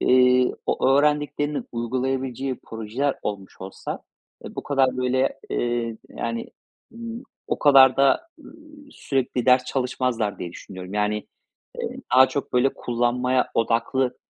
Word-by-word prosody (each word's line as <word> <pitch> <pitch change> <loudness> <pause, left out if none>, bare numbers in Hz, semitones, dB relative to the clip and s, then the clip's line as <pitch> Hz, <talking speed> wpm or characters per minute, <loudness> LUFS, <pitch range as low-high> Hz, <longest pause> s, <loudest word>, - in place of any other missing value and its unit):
eee, 125 0 +4
o - - +1
öğrendiklerini 145 +1 +1
uygulayabileceği 130 +2 -2
projeler 115 +6 -2
olmuş 100 -2 -6
olsa, 95 +1 -6 0.4
eee, - - -8
bu - - -3
kadar 135 -3 +1
böyle, 130 +1 0
eee, 120 -1 -1
yani, 115 0 -4 0.4
ımm, 230 +1 -7 0.2
o - - -1
kadar 135 -3 +7
da, 140 - +3
ııı, 300 - -13 0.4
sürekli 130 -2 -2
ders 125 0 +5
çalışmazlar 125 -4 -1
diye 85 - -6
düşünüyorum. 95 +1 -9
Yani, 105 0 0 0.5
eee, - - -4 0.2
daha 130 +1 +8
çok 135 +2 -4
böyle 125 +2 +3
kullanmaya 125 +1 0
odaklı, 120 +3 +1
125 Hz, 125 wpm, -24 LUFS, 115-135 Hz, 0.5 s, daha